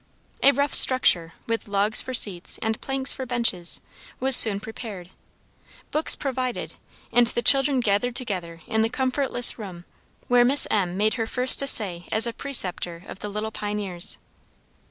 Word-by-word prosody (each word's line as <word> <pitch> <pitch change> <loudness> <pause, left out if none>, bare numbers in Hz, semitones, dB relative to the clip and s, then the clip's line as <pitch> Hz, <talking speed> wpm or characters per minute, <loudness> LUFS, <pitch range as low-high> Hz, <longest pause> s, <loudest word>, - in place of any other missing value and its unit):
A 280 - +4
rough 285 +1 -3
structure, 175 -10 +4
with 230 -1 -5
logs 205 +1 0
for 260 - -7
seats, 185 -6 0
and 220 0 -4
planks 270 0 -2
for 260 -1 -9
benches, 230 -8 -2 0.4
was 265 0 +6
soon 205 -3 +5
prepared, 205 -4 -11 0.8
books 310 +1 0
provided, 255 -3 -6 0.4
and 240 -1 +2
the 240 0 -2
children 270 0 +2
gathered 230 +3 -2
together 180 -9 -6
into 220 - -2
the 225 - -1
comfortless 255 -1 -2
room, 180 -5 -11 0.4
where 245 0 +2
Miss 270 +4 +8
M. 185 -4 -2
made 215 +2 0
her 225 - -4
first 250 +3 +6
essay 195 -10 +1
as 220 +1 0
a 235 - -5
preceptor 180 -11 -2
of - - -12
the 210 - -8
little 210 +2 -6
pioneers. 205 -5 -3
225 Hz, 155 wpm, -22 LUFS, 200-255 Hz, 0.8 s, Miss